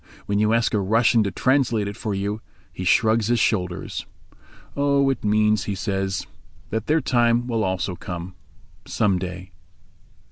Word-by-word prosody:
When 100 0 0
you 105 +1 +3
ask 115 +1 +2
a 105 - +2
Russian 110 +3 +3
to - - 0
translate 125 -4 +1
it 100 - -5
for 105 -3 -3
you 100 +2 -3 0.3
he 90 - -6
shrugs 110 +4 +3
his 120 0 +2
shoulders. 90 -5 -1 0.7
"Oh, 140 -1 +2
it 135 - -5
means," 105 0 +2
he 100 - -2
says, 95 -1 -2 0.5
"that 110 0 -2
their 155 +1 +3
time 120 -1 +2
will 115 -3 -1
also 95 -1 -1
come—some 90 +3 -4
day." 90 +1 -7
105 Hz, 150 wpm, -23 LUFS, 95-115 Hz, 0.7 s, you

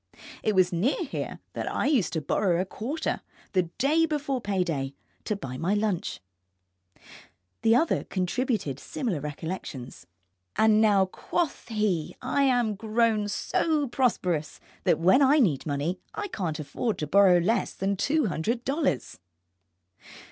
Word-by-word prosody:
It 215 - +1
was 185 -1 +4
near 230 - +1
here 280 - -4 0.2
that - - -3
I - - -1
used 275 - +2
to 160 - -1
borrow 175 +2 +1
a 185 - 0
quarter, 265 - -3 0.3
the 185 -4 +1
day 315 +5 +3
before 285 -4 -2
pay 195 -4 0
day, 140 -5 -3 0.3
to 210 - 0
buy 130 -10 -6
my 185 +8 0
lunch. 205 -4 -1 1.4
The 225 0 +4
other 315 +6 +2
contributed 185 - -1
similar 210 - -3
recollections. 145 - -6 0.5
And 220 -1 +4
now, 205 -3 +5
quoth 310 - -3
he, 210 -8 -1
I 255 +3 0
am 245 -5 +2
grown 220 0 +1
so 300 +7 0
prosperous 180 - 0 0.3
that - - +4
when 185 - +5
I 280 +2 +5
need 170 - +2
money 150 +6 -1 0.2
I 410 - -3
can't 175 - -3
afford 155 - -2
to 150 - -2
borrow 185 +3 +6
less 205 +7 +1
than 195 +1 0
two 280 +9 +1
hundred 225 +7 -1
dollars. 275 - -1
205 Hz, 145 wpm, -27 LUFS, 175-250 Hz, 1.4 s, borrow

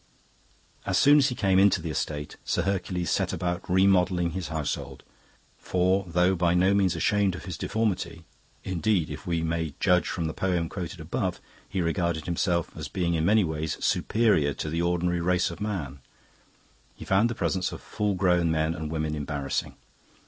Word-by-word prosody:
"As - - 0
soon 145 +1 +6
as 140 0 +3
he 125 - -4
came 95 -3 +3
into 100 -1 +5
the 80 -1 -4
estate, 75 0 -3
Sir 85 - 0
Hercules 90 -3 -1
set - - 0
about 90 0 -2
remodelling 90 -2 +3
his 90 0 -4
household. 80 -2 -4 0.6
For 95 +2 +1
though 90 +2 +2
by 85 -1 +2
no 95 +2 +4
means 95 -3 +2
ashamed 100 +2 +1
of - - -9
his 90 -4 -5
deformity 95 -4 -2 0.4
indeed, 95 -2 0
if - - -8
we 85 -2 0
may 80 -3 -2
judge 90 0 +3
from 85 - -2
the 80 - -2
poem 90 -4 -1
quoted 90 -2 -6
above, 90 +3 -2 0.3
he 95 - -1
regarded 85 -2 -1
himself 85 0 -1
as - - -5
being 85 -2 -1
in 80 -1 +1
many 105 +3 +4
ways 80 -2 -3
superior 100 -11 +2
to 75 - -4
the 85 +1 0
ordinary 85 0 0
race 90 0 +1
of 85 - -10
man 85 -11 -3 1.0
he - - -10
found 100 +5 +3
the 120 - -3
presence 95 -4 -1
of - - -7
full 105 -2 -2
grown 90 -2 +2
men 80 0 +1
and 80 -2 -5
women 80 -1 -2
embarrassing. 75 -2 -3
90 Hz, 180 wpm, -27 LUFS, 80-95 Hz, 1.0 s, soon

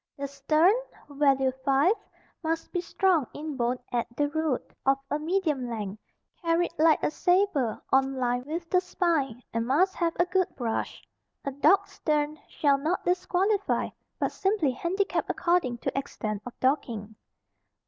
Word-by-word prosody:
The 280 0 -3
stern 305 +7 +3 0.4
(value 275 -2 +3
5) 275 +8 +4 0.5
must 325 0 -2
be 355 - -1
strong 355 - +2
in 300 0 -5
bone 245 0 0
at 240 -1 0
the 290 0 +2
root, 315 -3 -2
of 270 0 +3
a 295 - +1
medium 305 -6 0
length, 215 -2 -5 0.4
carried 335 0 +1
like 315 0 +4
a - - +2
sabre 355 - +2
on 270 0 +3
line 245 -1 0
with 335 +2 -4
the 365 - +4
spine 320 -10 0
and 230 0 -1
must 360 +9 +3
have 335 -2 -1
a 350 - +5
good 365 0 +1
brush. 230 -3 -3 0.4
A 280 - -1
docked 305 +8 +3
stern 300 0 -1
shall 280 -2 +2
not 320 +6 -1
disqualify, 375 +3 +1 0.3
but - - 0
simply 385 -8 +1
handicap 365 +10 -1
according 340 -9 +1
to - - -3
extent 215 -6 -3
of 250 - -10
docking. 230 -6 -1
295 Hz, 150 wpm, -27 LUFS, 260-350 Hz, 0.5 s, a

